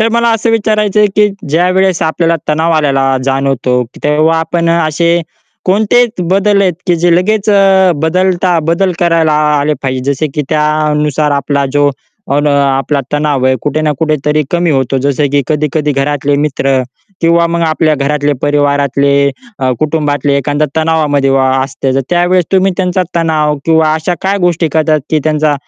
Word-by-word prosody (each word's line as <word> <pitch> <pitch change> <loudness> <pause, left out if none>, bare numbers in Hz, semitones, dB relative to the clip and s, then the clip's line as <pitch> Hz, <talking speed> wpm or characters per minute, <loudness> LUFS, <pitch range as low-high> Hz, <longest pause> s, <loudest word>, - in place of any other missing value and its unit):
तर 220 - +2
मला 235 0 +2
असं 225 +1 -1
विचारायचंय, 210 -1 +1
की 210 0 +4 0.2
ज्यावेळेस 180 +3 +1
आपल्याला 165 +1 0
तणाव 160 +2 +1
आल्याला 135 -3 +1
जाणवतो, 135 -2 0
की - - -14
तेव्हा 155 +2 +2
आपण 170 +1 -1
अ, 170 0 +2
असे 170 +2 +1 0.4
कोणते 215 +6 +3
त - - -2
बदल 200 +1 +2
आहेत, 185 -2 +1
की 175 -1 +2
जे 175 -1 +4
लगेच 210 +3 0
अ, 195 -2 +4
बदलता 180 +1 +1
बदल 185 +2 +1
करायला 165 -3 +2
आ 150 -1 +1
आले 150 +1 0
पाहिजे. 130 +1 -1
जसे 155 +3 -2
की 150 - -1
त्यानुसार 150 -1 0
आपला 140 0 -1
जो, 145 0 +2 0.4
अन् 145 +1 +1
आपला 140 0 +1
तणाव 145 -3 0
आहे, 130 - +2
कुठे 150 +1 -1
ना 150 -1 +1
कुठे 155 -1 +1
तरी 150 +1 +1
कमी 175 -1 0
होतो. 135 -1 0
जसं 140 +2 0
की 140 -1 +2
कधी-कधी 150 -1 -1
घरातले 140 +1 -1
मित्र 135 -2 0 0.4
किंवा 170 0 +3
मग 170 0 -2
आपल्या 155 -1 +1
घरातले, 145 +1 -1
परिवारातले, 140 -1 +1 0.4
अ, 130 -1 0
कुटुंबातले 145 -2 0
एखादा 145 +2 0
तणावामध्ये 150 -4 +1
वा 135 -1 +2
असते. 135 0 -3
तर 135 - +1
त्यावेळेस 175 0 +2
तुम्ही 190 0 +2
त्यांचा 185 -1 0
तणाव 155 -3 0
किंवा 160 -1 +2
अशा 160 +3 -2
काय 195 +1 0
गोष्टी 170 -1 -1
करतात, 155 -1 +1
की 155 - +2
त्यांचा 155 -1 +1
155 Hz, 170 wpm, -11 LUFS, 145-175 Hz, 0.4 s, की